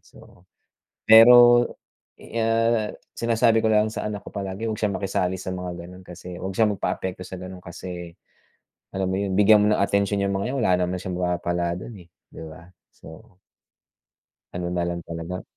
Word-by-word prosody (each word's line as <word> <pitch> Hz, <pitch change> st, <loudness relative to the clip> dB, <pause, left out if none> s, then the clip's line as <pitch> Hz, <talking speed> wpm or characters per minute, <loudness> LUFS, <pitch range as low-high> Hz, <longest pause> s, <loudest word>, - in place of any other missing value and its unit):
So 90 Hz, +1 st, -20 dB, 0.6 s
pero, 120 Hz, +2 st, +8 dB, 0.5 s
ah, 115 Hz, -1 st, 0 dB, 0.3 s
sinasabi 115 Hz, -1 st, +2 dB
ko 110 Hz, -, +2 dB
lang 105 Hz, 0 st, +3 dB
sa -, -, -4 dB
anak 105 Hz, -2 st, -6 dB
ko -, -, -10 dB
palagi 100 Hz, +2 st, -5 dB
huwag 110 Hz, -, -2 dB
siyang 105 Hz, -2 st, 0 dB
makisali 95 Hz, -2 st, -1 dB
sa 95 Hz, 0 st, -5 dB
mga 90 Hz, -1 st, -6 dB
gano'n 90 Hz, +1 st, -13 dB
kasi 90 Hz, 0 st, -10 dB
huwag 95 Hz, -, -4 dB
siya 115 Hz, -, +4 dB
magpa-apekto 95 Hz, -2 st, -3 dB
sa 95 Hz, -, -8 dB
gano'n 95 Hz, 0 st, -9 dB
kasi, 85 Hz, 0 st, -8 dB, 0.9 s
alam 95 Hz, -1 st, -1 dB
mo 95 Hz, -, -1 dB
yun, 100 Hz, -1 st, -2 dB
bigyan 105 Hz, +2 st, +6 dB
mo 105 Hz, -, +3 dB
ng 100 Hz, -, 0 dB
atensyon 100 Hz, 0 st, +1 dB
'yang 100 Hz, -, 0 dB
mga 120 Hz, +7 st, -3 dB
'yan -, -, -2 dB
wala 95 Hz, -5 st, +2 dB
naman 90 Hz, +1 st, -3 dB
siyang 90 Hz, -1 st, -5 dB
mapapala 85 Hz, -1 st, -1 dB
dun, 100 Hz, +5 st, -8 dB
eh, 90 Hz, -3 st, -15 dB, 0.2 s
'di -, -, -11 dB
ba. 80 Hz, +2 st, -13 dB, 0.2 s
So 90 Hz, -, -15 dB, 1.1 s
ano 90 Hz, 0 st, -4 dB
na 90 Hz, -1 st, -1 dB
lang 85 Hz, 0 st, -3 dB
talaga 85 Hz, +2 st, -6 dB
95 Hz, 175 wpm, -23 LUFS, 90-110 Hz, 1.1 s, pero